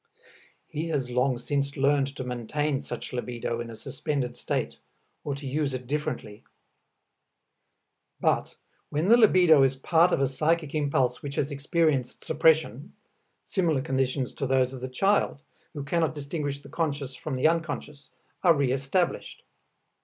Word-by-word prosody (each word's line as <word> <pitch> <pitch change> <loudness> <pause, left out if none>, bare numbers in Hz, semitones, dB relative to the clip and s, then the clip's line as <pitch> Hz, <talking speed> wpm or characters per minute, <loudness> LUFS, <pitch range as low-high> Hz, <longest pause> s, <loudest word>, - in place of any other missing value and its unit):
He 160 +3 -4
has 135 -6 -2
long 125 +1 +2
since 140 +3 -2
learned 140 0 +3
to 130 - -4
maintain 130 +4 -2
such - - -7
libido 120 -1 -3
in 120 - -6
a 115 - -8
suspended 135 0 -3
state - - -3 0.5
or 145 - -2
to 140 0 -9
use 140 0 -1
it 125 0 -6
differently. 130 -7 -4 1.8
But - - +1 0.3
when 155 +6 0
the 235 - +9
libido 180 - +6
is 135 0 +3
part 165 +6 +3
of - - +2
a 135 - +3
psychic 155 +3 0
impulse 135 -5 +1
which 140 -1 -6
has 145 +1 -1
experienced 140 -2 0
suppression, - - +2 0.5
similar 165 -8 +1
conditions 135 -2 -1
to 135 - -3
those 130 0 +2
of 130 - -8
the 130 - -4
child, 195 0 +1 0.3
who 145 - -4
cannot 160 +2 0
distinguish 145 -1 -4
the - - -13
conscious 145 -5 -2
from 135 +1 -5
the 130 +4 +3
unconscious, 155 -3 -3 0.3
are 170 -3 +5
reëstablished. 135 +5 -1
140 Hz, 145 wpm, -27 LUFS, 130-155 Hz, 1.8 s, the